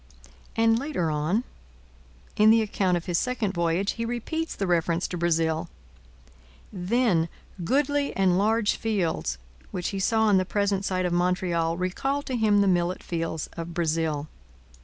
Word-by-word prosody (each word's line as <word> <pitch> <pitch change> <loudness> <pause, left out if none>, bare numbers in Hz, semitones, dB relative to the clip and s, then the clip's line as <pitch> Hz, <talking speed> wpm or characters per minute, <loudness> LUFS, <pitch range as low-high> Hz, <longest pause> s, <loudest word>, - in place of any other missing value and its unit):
And 225 0 +3
later 250 - -1
on, 155 +10 0 0.9
in 215 +1 +5
the 225 0 +5
account 190 -4 +1
of 170 - -6
his 175 -2 +1
second 245 -6 -1
voyage, 170 +3 +1
he 230 - -4
repeats 245 +8 -3
the 195 - -2
reference 170 -1 +1
to - - -4
Brazil; 165 0 +1 1.0
then 185 -3 +1 0.3
'goodly 285 - +1
and 190 -2 +3
large 215 +2 +2
fields' 175 - -1 0.3
which 180 - -3
he 195 - -4
saw 220 +3 +2
on 210 -3 +4
the 185 - +3
present 200 0 0
site 185 -1 0
of 175 - 0
Montreal 175 -2 +1
recall 270 +11 -1
to 260 - -3
him 210 -3 +3
the 200 - +3
millet 175 0 +1
fields 165 -2 -3
of 170 0 -6
Brazil. 160 -3 0
185 Hz, 155 wpm, -26 LUFS, 170-220 Hz, 1.0 s, in